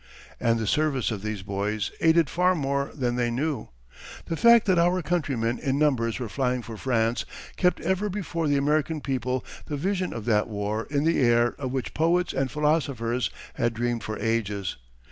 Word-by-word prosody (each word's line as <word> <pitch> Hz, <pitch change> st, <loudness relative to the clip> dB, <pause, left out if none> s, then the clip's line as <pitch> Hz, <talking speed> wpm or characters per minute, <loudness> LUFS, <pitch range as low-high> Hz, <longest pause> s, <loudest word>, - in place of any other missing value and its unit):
And 115 Hz, 0 st, +2 dB
the 110 Hz, -, -2 dB
service 140 Hz, 0 st, +1 dB
of 105 Hz, -3 st, -4 dB
these 105 Hz, -2 st, -4 dB
boys 100 Hz, +2 st, -2 dB
aided 165 Hz, -1 st, +5 dB
far 180 Hz, +5 st, +2 dB
more 140 Hz, -2 st, -1 dB
than 125 Hz, -4 st, -1 dB
they 120 Hz, -1 st, +1 dB
knew. 135 Hz, 0 st, -2 dB, 0.6 s
The 165 Hz, -, -2 dB
fact 235 Hz, +5 st, +6 dB
that 185 Hz, -4 st, +3 dB
our 175 Hz, +1 st, +2 dB
countrymen 135 Hz, -8 st, -1 dB
in 135 Hz, -2 st, 0 dB
numbers 130 Hz, -7 st, +1 dB
were 125 Hz, -, -3 dB
flying 125 Hz, +1 st, -1 dB
for 115 Hz, -1 st, -8 dB
France 115 Hz, 0 st, 0 dB, 0.3 s
kept 180 Hz, -1 st, +2 dB
ever 190 Hz, +2 st, 0 dB
before 175 Hz, -5 st, -2 dB
the 145 Hz, -1 st, +3 dB
American 150 Hz, +2 st, +1 dB
people 130 Hz, -2 st, -2 dB, 0.2 s
the 145 Hz, -, -3 dB
vision 185 Hz, +3 st, -1 dB
of 115 Hz, -2 st, -6 dB
that 105 Hz, -3 st, +2 dB
war 105 Hz, +1 st, -3 dB
in 145 Hz, 0 st, 0 dB
the 165 Hz, +1 st, +2 dB
air 120 Hz, -1 st, +3 dB
of 130 Hz, -3 st, -3 dB
which 130 Hz, -2 st, -3 dB
poets 170 Hz, +3 st, +2 dB
and 135 Hz, -1 st, 0 dB
philosophers 140 Hz, -6 st, 0 dB, 0.2 s
had 120 Hz, 0 st, -1 dB
dreamed 120 Hz, 0 st, -1 dB
for 110 Hz, 0 st, -4 dB
ages. 105 Hz, -4 st, -1 dB
130 Hz, 185 wpm, -26 LUFS, 115-155 Hz, 0.6 s, fact